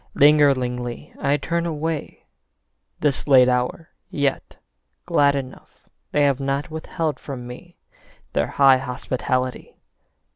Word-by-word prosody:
Lingeringly 130 -5 +2
I 140 +1 +1
turn 170 +4 -2
away, 160 -1 -4 0.8
This 145 -2 0
late 130 -3 +6
hour, 125 +6 -1 0.2
yet 140 -2 -2 0.5
glad 140 0 +3
enough 130 -2 -8 0.2
They 145 - +2
have 140 -2 +2
not 140 +3 -2
withheld 160 0 -3
from 130 -4 -7
me 125 +8 -11 0.6
Their 70 - +1
high 135 -2 +5
hospitality. 130 0 -3
140 Hz, 110 wpm, -22 LUFS, 130-150 Hz, 0.8 s, late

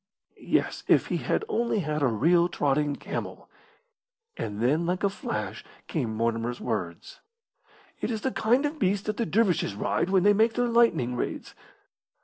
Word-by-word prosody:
Yes, - - -1
if - - +3
he - - +1
had - - -1
only 235 - 0
had 150 -2 -2
a 140 - +4
real 170 +10 +3
trotting 145 -1 0
camel! - - -6 0.8
And 105 -1 -5
then 150 +9 +1
like 180 +2 -1
a 200 - +3
flash - - -4 0.2
came 125 - -2
Mortimer's 115 +1 -1
words, 90 -8 -4 0.8
"It - - -2
is 220 -3 -3
the 265 - -1
kind 245 +6 +2
of 300 +1 -3
beast 195 -2 +1
that 215 -1 -2
the 235 - -1
dervishes 180 - +1
ride 105 - -1
when 190 -2 +3
they 205 +1 +6
make 225 +2 +3
their 245 - +1
lightning 230 - +2
raids." - - -4
175 Hz, 165 wpm, -27 LUFS, -, 0.8 s, they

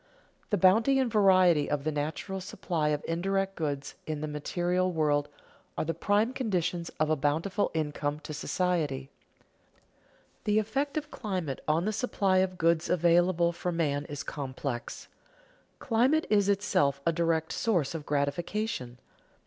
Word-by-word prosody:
_The 205 - +2
bounty 220 +9 +5
and 260 -3 +1
variety 185 -7 +5
of 145 -1 -1
the 155 - 0
natural 155 +6 -3
supply 170 -4 -2
of 150 -1 -1
indirect 195 +3 -1
goods 145 -3 -3
in 155 -1 -3
the 155 - -2
material 175 +5 -1
world 150 -3 +1 0.5
are - - 0
the 165 - -1
prime 210 +7 +1
conditions 180 -9 -1
of 155 0 +2
a - - +4
bountiful 160 +8 0
income 150 -1 -2
to 155 - -7
society._ 150 -5 -1 1.4
The 210 0 +2
effect 270 +8 -1
of 300 0 -4
climate 185 - -3
on 160 +3 +2
the 215 - 0
supply 200 -4 +1
of 185 -1 0
goods 165 -1 +2
available 175 0 +3
for 175 +1 -3
man 145 -4 0
is 145 -1 -6
complex. 130 -3 -5 0.7
Climate 265 +6 +2
is 205 -2 +4
itself 145 -9 +2
a 170 - +4
direct 165 -1 0
source 175 -12 0
of 160 -2 -5
gratification. 145 - -2
170 Hz, 145 wpm, -29 LUFS, 150-195 Hz, 1.4 s, bounty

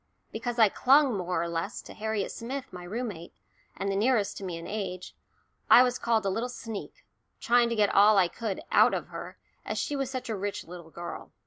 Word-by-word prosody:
Because 235 +2 -4
I 225 -2 +7
clung 270 +4 +4
more 180 -3 -1
or - - -2
less 165 0 -3
to - - -11
Harriet 220 -2 -2
Smith, 255 0 -6
my 180 -1 -8
room 230 +7 -3
mate, 170 -3 -9 0.4
and 195 +1 -1
the - - -1
nearest 215 -1 +2
to - - -9
me 180 -3 -4
in 165 - -8
age, 195 -4 -5 0.6
I 245 - +9
was 250 0 0
called 225 -3 +1
a - - +2
little 230 +6 -2
sneak, 225 -4 -8 0.3
trying 240 0 +3
to 235 - -1
get 210 -2 +2
all 205 +1 +6
I 185 -2 +5
could 205 +2 -4
"out - - +5
of - - -5
her," - - -8 0.3
as - - -4
she 295 - -1
was 270 -2 -2
such 260 -1 -5
a 225 - -2
rich 200 +1 -4
little 170 -1 -10
girl. 170 +1 -8
215 Hz, 220 wpm, -28 LUFS, 185-240 Hz, 0.6 s, I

